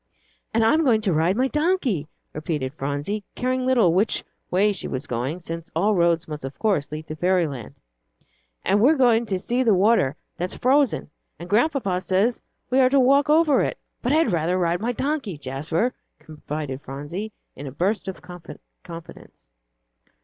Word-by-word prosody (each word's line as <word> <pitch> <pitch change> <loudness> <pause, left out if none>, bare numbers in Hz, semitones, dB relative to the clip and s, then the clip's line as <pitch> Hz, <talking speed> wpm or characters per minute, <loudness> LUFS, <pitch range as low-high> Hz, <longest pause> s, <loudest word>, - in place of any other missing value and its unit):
"And 225 0 +2
I'm 310 +8 +4
going 230 -6 +3
to 200 -5 +1
ride 165 +6 +2
my 260 +2 +2
donkey," 295 - 0 0.3
repeated 150 -4 -3
Phronsie, 145 +9 -3
caring 255 0 -1
little 230 -10 +4
which 200 +5 +1 0.3
way 205 +3 +3
she 180 - -5
was 130 +2 -4
going, 130 +8 -3
since 165 0 -7
all 200 +6 +2
roads 170 -3 +2
must 150 -2 -7
of 135 +1 -7
course 195 -11 0
lead 155 +1 -6
to 155 - -6
fairy 180 +2 +2
land, 130 -7 -8 0.9
"and 205 - +3
we're 285 +7 +5
going 235 -4 +3
to 190 - 0
see 240 +7 -1
the 225 -5 +4
water 185 - +3 0.2
that's 180 +1 -3
frozen, 265 - +2 0.3
and 170 +3 -9
Grandpapa 210 - +1
says 200 +6 +1 0.3
we 260 - +4
are 255 -1 +5
to 275 +1 +4
walk 275 +3 +4
over 310 -2 +4
it; - - -1 0.2
but 245 - 0
I'd 310 -6 +3
rather 170 +2 +1
ride 175 0 0
my 235 +2 0
donkey, 270 - -2
Jasper," 155 - -2 0.2
confided 150 -3 -6
Phronsie, 145 +11 -6 0.2
in 140 - -8
a - - -6
burst 190 - -1
of 190 - -6
confidence. 170 - -12
185 Hz, 170 wpm, -23 LUFS, 155-245 Hz, 0.9 s, we're